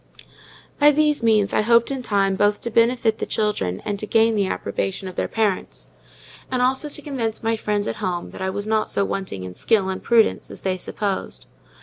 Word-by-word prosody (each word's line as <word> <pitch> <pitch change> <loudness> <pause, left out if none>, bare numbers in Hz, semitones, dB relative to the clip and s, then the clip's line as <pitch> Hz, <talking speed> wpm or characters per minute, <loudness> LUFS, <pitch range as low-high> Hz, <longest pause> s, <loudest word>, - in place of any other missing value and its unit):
By 295 0 +7
these 300 -1 +2
means 215 -3 +2
I - - +3
hoped 235 +3 +4
in 270 -1 -3
time 200 -4 +1
both 205 +1 +2
to 235 - -3
benefit 230 -1 +2
the - - -3
children 95 - -1
and 205 -1 -2
to 215 - -4
gain 225 +1 +3
the 200 -3 +1
approbation 190 0 -3
of 185 - -8
their - - -1
parents; 210 - -2 0.6
and 255 - -1
also 265 +4 +1
to 300 - -4
convince 240 -8 -3
my 225 0 +1
friends 210 -1 -1
at - - -3
home 180 -4 -3
that - - -10
I 190 - -1
was 205 +2 -4
not 215 0 0
so 200 - 0
wanting 190 - -4
in 90 0 -7
skill 195 - +1
and 190 - -4
prudence 230 -2 +2
as - - -10
they 185 -1 0
supposed. 200 +1 -4
215 Hz, 210 wpm, -22 LUFS, 195-235 Hz, 0.6 s, By